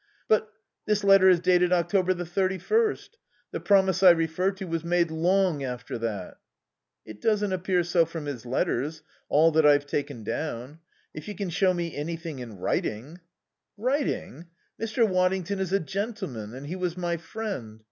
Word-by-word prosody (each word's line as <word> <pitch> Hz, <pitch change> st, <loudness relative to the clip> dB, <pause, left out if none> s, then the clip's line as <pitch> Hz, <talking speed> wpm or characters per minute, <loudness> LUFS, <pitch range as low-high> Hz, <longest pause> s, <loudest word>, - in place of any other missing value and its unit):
"But 215 Hz, 0 st, +2 dB, 0.4 s
this 210 Hz, -1 st, +1 dB
letter 195 Hz, -1 st, +7 dB
is 180 Hz, -2 st, +5 dB
dated 180 Hz, 0 st, +3 dB
October 185 Hz, +1 st, +2 dB
the 175 Hz, 0 st, -4 dB
thirty 190 Hz, +2 st, 0 dB
first. 450 Hz, -, 0 dB, 0.3 s
The -, -, -3 dB
promise 190 Hz, -2 st, +3 dB
I 190 Hz, -, +9 dB
refer 165 Hz, +2 st, +2 dB
to 190 Hz, 0 st, -7 dB
was 165 Hz, -2 st, -3 dB
made 170 Hz, -1 st, +1 dB
long 175 Hz, -2 st, +1 dB
after 125 Hz, -2 st, -5 dB
that." 105 Hz, -5 st, -4 dB, 0.7 s
"It 110 Hz, -1 st, -11 dB
doesn't 210 Hz, -3 st, +1 dB
appear 185 Hz, -1 st, +1 dB
so 170 Hz, -1 st, +3 dB
from 165 Hz, -2 st, -6 dB
his 140 Hz, -5 st, -5 dB
letters 135 Hz, +4 st, -1 dB, 0.3 s
all 160 Hz, +3 st, +5 dB
that 160 Hz, 0 st, +3 dB
I've 145 Hz, -1 st, +5 dB
taken 140 Hz, -4 st, -3 dB
down. 140 Hz, +4 st, -4 dB, 0.3 s
If 155 Hz, -, -9 dB
you 210 Hz, -, -5 dB
can 195 Hz, -4 st, -4 dB
show 190 Hz, +2 st, +3 dB
me 170 Hz, -2 st, -3 dB
anything 165 Hz, -1 st, -5 dB
in 115 Hz, -5 st, -8 dB
writing 125 Hz, -, -3 dB, 0.3 s
" -, -, -60 dB
"Writing? 260 Hz, -, -2 dB, 0.3 s
Mr. 225 Hz, +1 st, +2 dB
Waddington 185 Hz, 0 st, 0 dB
is 190 Hz, -2 st, -2 dB
a 195 Hz, -, +3 dB
gentleman 190 Hz, -, -5 dB
and 135 Hz, +2 st, -8 dB
he 165 Hz, +5 st, -5 dB
was 180 Hz, -2 st, -3 dB
my 175 Hz, -1 st, -1 dB
friend. 165 Hz, -, -6 dB
175 Hz, 170 wpm, -26 LUFS, 150-190 Hz, 0.7 s, I